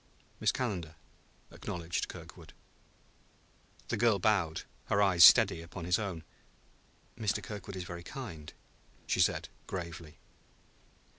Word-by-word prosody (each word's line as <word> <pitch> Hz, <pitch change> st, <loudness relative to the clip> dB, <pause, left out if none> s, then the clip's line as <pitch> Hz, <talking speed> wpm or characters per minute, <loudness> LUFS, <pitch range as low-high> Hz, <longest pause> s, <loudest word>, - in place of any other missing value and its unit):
"Miss -, -, +3 dB
Calendar," 90 Hz, -11 st, -3 dB, 0.6 s
acknowledged 85 Hz, -1 st, -4 dB
Kirkwood. -, -, -11 dB, 1.4 s
The -, -, 0 dB
girl 115 Hz, -1 st, +4 dB
bowed, 95 Hz, -5 st, +1 dB, 0.2 s
her 100 Hz, -, +1 dB
eyes 95 Hz, -4 st, +5 dB
steady 80 Hz, -, +8 dB
upon 85 Hz, +1 st, -8 dB
his 90 Hz, +3 st, +2 dB
own. 95 Hz, -6 st, -4 dB, 0.9 s
"Mr. 105 Hz, -2 st, -1 dB
Kirkwood 100 Hz, -2 st, -7 dB
is 95 Hz, -, -4 dB
very 85 Hz, -1 st, -7 dB
kind," 85 Hz, -, -8 dB, 0.5 s
she -, -, 0 dB
said -, -, +2 dB, 0.2 s
gravely. 85 Hz, -4 st, -6 dB
90 Hz, 115 wpm, -32 LUFS, 85-105 Hz, 1.4 s, steady